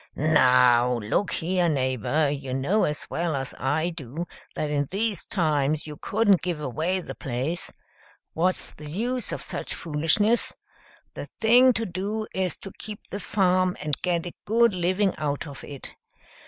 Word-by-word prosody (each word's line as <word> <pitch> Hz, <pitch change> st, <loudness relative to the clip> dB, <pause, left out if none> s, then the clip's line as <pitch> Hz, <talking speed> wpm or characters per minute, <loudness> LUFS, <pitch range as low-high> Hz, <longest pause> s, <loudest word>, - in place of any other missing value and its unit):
"Now 125 Hz, -5 st, +4 dB
look 115 Hz, -, 0 dB
here, 175 Hz, +1 st, +1 dB
neighbor, 135 Hz, +1 st, +1 dB
you 140 Hz, -2 st, -3 dB
know 175 Hz, +12 st, +2 dB
as 150 Hz, 0 st, -3 dB
well 170 Hz, -2 st, -1 dB
as 135 Hz, -1 st, -4 dB
I 155 Hz, +6 st, 0 dB
do 160 Hz, +1 st, -6 dB, 0.3 s
that 150 Hz, -1 st, -2 dB
in 145 Hz, -1 st, 0 dB
these 210 Hz, +1 st, -1 dB
times 155 Hz, -4 st, +1 dB
you 150 Hz, -1 st, -7 dB
couldn't 205 Hz, +3 st, +2 dB
give 175 Hz, -4 st, -2 dB
away 160 Hz, +7 st, -1 dB
the -, -, -7 dB
place. 135 Hz, +7 st, -3 dB, 0.6 s
What's 180 Hz, +3 st, 0 dB
the 150 Hz, 0 st, -9 dB
use 240 Hz, +8 st, -1 dB
of -, -, -3 dB
such -, -, -4 dB
foolishness? 165 Hz, +9 st, +2 dB, 0.6 s
The -, -, -7 dB
thing 245 Hz, +3 st, +7 dB
to 230 Hz, 0 st, -1 dB
do 205 Hz, +4 st, -3 dB
is 185 Hz, -3 st, -1 dB
to 195 Hz, -, -8 dB
keep 210 Hz, -1 st, -8 dB
the 200 Hz, -, -3 dB
farm 185 Hz, -3 st, +2 dB
and 150 Hz, -2 st, -1 dB
get 175 Hz, -2 st, 0 dB
a 175 Hz, -, -6 dB
good 230 Hz, +1 st, +4 dB
living 185 Hz, +2 st, +1 dB
out 145 Hz, -2 st, -2 dB
of 140 Hz, -3 st, -9 dB
it. 140 Hz, -2 st, -8 dB
165 Hz, 160 wpm, -25 LUFS, 145-195 Hz, 0.6 s, thing